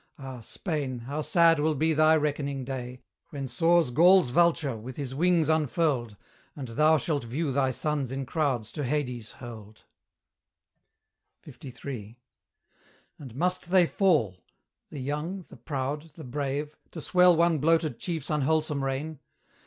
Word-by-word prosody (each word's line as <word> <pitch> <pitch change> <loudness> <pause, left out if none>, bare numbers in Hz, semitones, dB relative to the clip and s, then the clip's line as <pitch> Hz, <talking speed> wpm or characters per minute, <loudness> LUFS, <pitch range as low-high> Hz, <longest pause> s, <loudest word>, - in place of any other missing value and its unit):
Ah, 135 -2 -8
Spain! 140 - -4
how 140 +6 -4
sad 165 0 +4
will 155 +1 +1
be 160 +3 +1
thy 155 +1 +5
reckoning 140 -3 -1
day, 125 -1 -6 0.3
When 140 -2 -5
soars 165 +2 +2
Gaul's 175 0 +5
Vulture, 165 -4 +2
with 120 +4 -8
his 135 -3 -5
wings 170 +1 +2
unfurled, 145 -7 0 0.4
And 135 -4 -7
thou 155 +7 +4
shalt 150 -3 -2
view 140 +6 -2
thy 135 0 +1
sons 140 0 -2
in 135 0 -3
crowds 130 -7 -1
to 150 - -4
Hades 125 -5 -3
hurled. 110 -3 -11 1.6
LIII. 120 -4 -9 1.0
And 130 -5 -10
must 180 +3 -1
they 185 -1 +5
fall 155 - +1 0.5
the 150 - -9
young, 150 +8 -4
the - - -13
proud, 140 +4 -4
the 160 - -10
brave 145 +3 -3 0.2
To 165 - -6
swell 180 +2 +4
one 165 -1 +3
bloated 160 -4 +1
chief's 160 -5 -4
unwholesome 150 -1 0
reign? 135 +3 -3
145 Hz, 140 wpm, -27 LUFS, 130-160 Hz, 1.6 s, thy